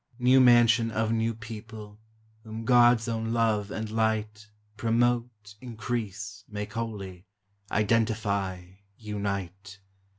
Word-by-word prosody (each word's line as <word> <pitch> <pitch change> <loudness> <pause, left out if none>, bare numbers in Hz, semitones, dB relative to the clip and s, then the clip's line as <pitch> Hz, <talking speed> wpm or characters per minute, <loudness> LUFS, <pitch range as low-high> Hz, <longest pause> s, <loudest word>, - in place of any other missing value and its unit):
New 130 +1 +5
mansion 120 -2 +5
of 110 0 -1
new 115 0 0
people, 110 -1 -10 0.4
Whom 110 0 -7
God's 120 -1 +5
own 115 0 -2
love 110 -3 +1
and 110 +1 -4
light 110 -1 -2 0.3
Promote, 115 -2 0
increase, 110 -4 -5
make 105 0 -6
holy, 100 -5 -6 0.4
Identify, 100 -4 0 0.3
unite! 100 -2 -5
110 Hz, 100 wpm, -27 LUFS, 105-115 Hz, 0.4 s, New